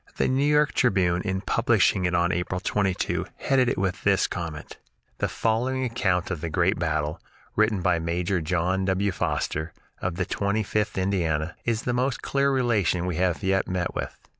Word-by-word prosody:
The - - +2
"New 130 +2 +1
York 150 0 +3
Tribune," 95 -7 +2
in 95 -1 -2
publishing 105 -5 +2
it 90 0 +1
on 85 0 +2
April 90 +1 -2
22, 95 -1 -1
headed 130 -3 +2
it - - -1
with 95 -1 -1
this 100 -1 +3
comment: 80 -4 -6 0.4
"The - - +1
following 125 +4 0
account 95 -7 0
of 85 -5 -3
the 85 - -3
great 90 +4 +1
battle, 80 -2 -1 0.3
written 110 -3 +2
by 85 - +2
Major 85 +2 -1
John 90 +3 0
W. 95 +1 +1
Foster, 80 -2 -2 0.3
of 90 -1 -2
the 90 0 -1
Twenty 100 +4 -1
fifth 105 0 -1
Indiana, 85 -4 0
is 115 -1 0
the 125 - -1
most 125 +2 -1
clear 140 0 +1
relation 110 -9 +1
we 90 -3 -2
have 90 0 0
yet 95 0 +1
met 90 -1 -2
with." - - -4
95 Hz, 180 wpm, -25 LUFS, 85-110 Hz, 0.4 s, York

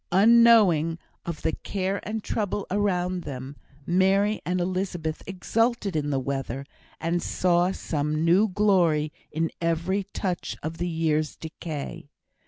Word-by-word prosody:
Unknowing 200 -6 +6 0.3
of 170 -2 -5
the - - +2
care 195 +3 -2
and 220 0 -3
trouble 205 -2 -2
around 185 -3 0
them, 135 -2 -7 0.3
Mary 195 +4 +2
and 180 +1 0
Elizabeth 175 -3 -2
exulted 210 +1 0
in 145 -1 0
the 135 -2 +1
weather, 135 0 -3 0.3
and 170 +1 0
saw 180 0 +2
some 155 -3 -1
new 185 +6 +5
glory 180 -7 +2 0.2
in 160 +1 -1
every 170 +4 0
touch 185 -3 -3
of 160 +2 -5
the 175 0 -1
year's 155 -2 0
decay. 155 -3 -7
175 Hz, 130 wpm, -26 LUFS, 155-195 Hz, 0.3 s, Unknowing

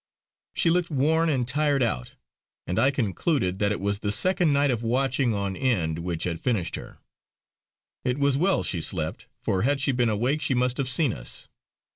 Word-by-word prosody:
She 165 - +2
looked 175 0 +1
worn 160 +3 +2
and 130 -5 0
tired 145 -1 +1
out, 65 - -2 0.5
and 90 - -1
I 135 - +5
concluded 115 - -1
that 105 0 +2
it 105 - -2
was 100 +1 -1
the 105 - -2
second 180 - +2
night 140 -1 +3
of 115 -2 -2
watching 125 0 +1
on 100 -1 -2
end 90 -12 0
which 85 -1 -3
had 85 -2 -2
finished 100 -9 -1
her. - - -9 1.1
It 125 +1 0
was 140 -1 +2
well 180 +7 +2
she 85 - -2
slept, 80 -2 -3
for 95 - -1
had 140 +3 +2
she 140 +1 +1
been 125 -2 +1
awake 125 +8 0
she 145 -3 +1
must 125 0 +1
have 135 -2 -1
seen 130 -2 +2
us. - - -7
125 Hz, 190 wpm, -25 LUFS, 100-140 Hz, 1.1 s, I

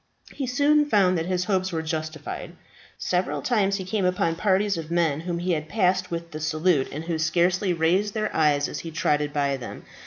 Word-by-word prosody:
He 270 - -3
soon 290 +3 +3
found 190 -6 +4
that 165 0 -1
his 180 -1 0
hopes 190 -2 0
were 160 -1 -2
justified. 155 -1 -5 0.4
Several 180 0 -1
times 200 -5 +2
he 190 -2 -4
came 200 +1 -1
upon 180 -2 +1
parties 200 +2 +2
of 160 -1 -6
men 165 -4 +1
whom 170 +1 -3
he 175 -2 0
passed 185 +2 0
with 170 0 -5
the 155 - -6
salute, 155 -1 +1
and 150 +3 -5
who 165 -1 -2
scarcely 175 +4 +2
raised 180 +5 +1
their 215 -1 -2
eyes 145 -2 +3
as - - -5
he 165 - -6
trotted 150 -2 0
by 140 -2 0
them. 125 - -8
175 Hz, 195 wpm, -25 LUFS, 155-190 Hz, 0.4 s, found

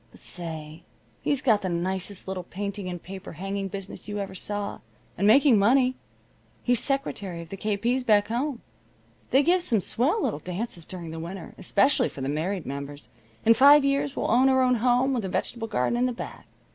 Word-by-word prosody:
But - - -18
say, 160 -2 -5 0.4
he's 285 -2 0
got 220 -5 +4
the 185 - -2
nicest 185 +3 -3
little 190 -1 -3
painting 200 +1 -5
and 175 -2 -6
paper 190 0 -8
hanging 195 +4 -3
business 195 +2 -8
you 205 0 -4
ever 200 -1 -4
saw, 205 +2 -4 0.4
and 200 - +1
making 250 0 +6
money. 255 +5 +4 0.7
He's 245 -2 +2
secretary 210 -10 -2
of 170 -1 -9
the 195 - -6
K. 210 +1 -1
P.'s 245 +5 0
back 210 -4 +4
home. 250 +2 -2 0.7
They 270 +2 +4
give 355 +4 +3
some 240 - +1
swell 290 - +1
little 145 - -1
dances 180 0 -5
during 175 -3 -7
the 165 - -6
winter, 170 +1 -7
especially 250 +5 +3
for 135 - -9
the 135 - -2
married 165 +4 -2
members. 140 -1 -7 0.4
In 230 - +8
five 280 +4 +7
years 275 0 0
we'll - - -1
own 255 +3 +5
our 260 -1 +4
home, 250 +3 +2
with 240 -4 -1
a 190 - -3
vegetable 225 +4 -2
garden 215 - 0
in 250 - +3
the 250 - -2
back. - - -8
205 Hz, 195 wpm, -26 LUFS, 180-250 Hz, 0.7 s, In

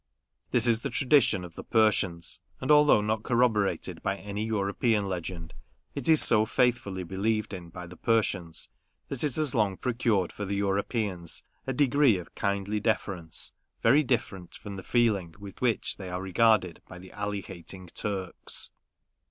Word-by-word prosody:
This 120 -1 +5
is 115 -1 +4
the - - -3
tradition 135 -8 +3
of 85 -1 -10
the - - -9
Persians; 100 -7 +1 0.2
and 130 - -1
although 150 -7 +6
not 110 +1 -1
corroborated 110 -7 0
by 100 - -1
any 105 +2 -5
European 105 0 0
legend, 85 -2 -5 0.4
it 140 +1 -1
is 160 -1 +8
so 110 -2 +6
faithfully 110 -5 0
believed 105 +4 -2
in 90 -3 -8
by 90 +1 -9
the 90 +1 -12
Persians, 95 -8 -1 0.4
that 135 -1 -1
it 145 -5 0
has 155 -4 +1
long 100 -4 +1
procured 115 -7 0
for 105 - -7
the 100 0 -2
Europeans 100 -2 -2 0.2
a 135 - -1
degree 140 -4 +3
of 90 -3 -10
kindly 100 +1 -1
deference, 100 -6 -1 0.3
very 145 - +5
different 110 - -3
from 100 -1 -8
the 95 - -7
feeling 100 -7 0
with 100 -2 -11
which 120 -3 0
they 95 -2 -7
are 90 0 -3
regarded 95 -2 +2
by 90 - -11
the 95 +1 -13
Ali 100 -1 -3
hating 95 0 -10
Turks. 95 +1 -5
100 Hz, 160 wpm, -28 LUFS, 95-115 Hz, 0.4 s, is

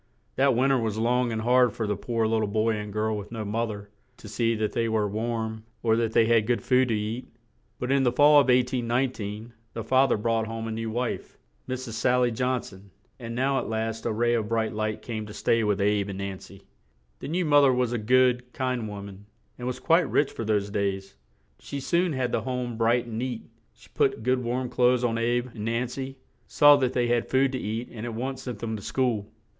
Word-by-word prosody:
That 135 -2 +3
win 135 +3 +3
ter 135 - +3
was 110 -2 -2
long 120 +2 +1
and 110 -1 -3
hard 125 -1 +4
for 110 - -3
the 105 0 -1
poor 115 +2 -1
lit 110 0 +1
tle 105 - 0
boy 110 +2 +1
and 105 -1 -5
girl 110 +1 -1
with 105 0 -7
no 110 -2 -4
moth 115 +3 -1
er 100 -1 -8 0.3
to - - -12
see 115 +2 0
that 110 -1 -1
they 115 -1 0
were 110 -2 +1
warm, 110 +1 -3 0.2
or 110 -1 +3
that 115 -1 0
they 115 - +5
had 115 -2 +3
good 120 -1 0
food 130 0 +3
to 115 - 0
eat; 110 +4 -4 0.5
but 125 +1 -3
in 140 0 +3
the 125 -2 +3
fall 145 +3 +6
of 140 - +4
1819, 120 -3 0 0.2
the 115 - -4
fa 130 +4 +4
ther - - +2
brought 115 +1 0
home 115 0 -5
a - - -4
new 115 0 -3
wife, 120 +2 -3 0.3
Mrs. 130 -2 -4
Sal 125 +3 +2
ly 125 - +3
John 125 +2 -1
son 95 +1 -13 0.3
and 115 -1 -6
now 135 +2 +1
at - - -5
last 110 0 -2
a - - 0
ray 120 +2 +1
of 110 -3 -1
bright 115 -1 0
light 110 0 -3
came 110 -3 -5
to 105 - -10
stay 115 -1 +1
with 105 -2 +1
"Abe" 100 0 +1
and 95 - -5
Nan 100 -1 -5
cy. 100 0 -14 0.6
The - - -6
new 175 +4 -1
moth 145 -2 +5
er 135 - +5
was 125 -1 0
a 120 - -1
good, 125 +2 +2
kind 125 -3 -2
wo 100 -1 -7
man, 100 0 -11 0.3
and 125 - -4
was 125 - -3
quite 165 -2 +3
rich 145 - +2
for - - -5
those 105 -2 0
days. 100 -4 -2 0.4
She 140 - -6
soon 170 +4 +1
had 130 -2 -1
the - - 0
home 125 -2 -3
bright 115 +2 +2
and 115 -1 -5
neat; 125 -2 -3 0.3
she - - -19
put - - +1
good 125 +1 +1
warm 125 +2 -2
clothes 125 0 +2
on 115 -1 0
"Abe" 120 +2 0
and 105 -2 -6
Nan 115 +2 0
cy; 135 +2 -6 0.3
saw 145 0 +7
that 130 -2 0
they 125 -1 +1
had 120 -1 0
food 135 0 +3
to 130 - -3
eat 110 +3 -4
and 110 -2 -8
at 120 -2 -4
once 130 +3 -4
sent 125 -4 -6
them 110 0 -4
to 105 - -7
school. 115 -2 -1
115 Hz, 240 wpm, -26 LUFS, 110-125 Hz, 0.6 s, saw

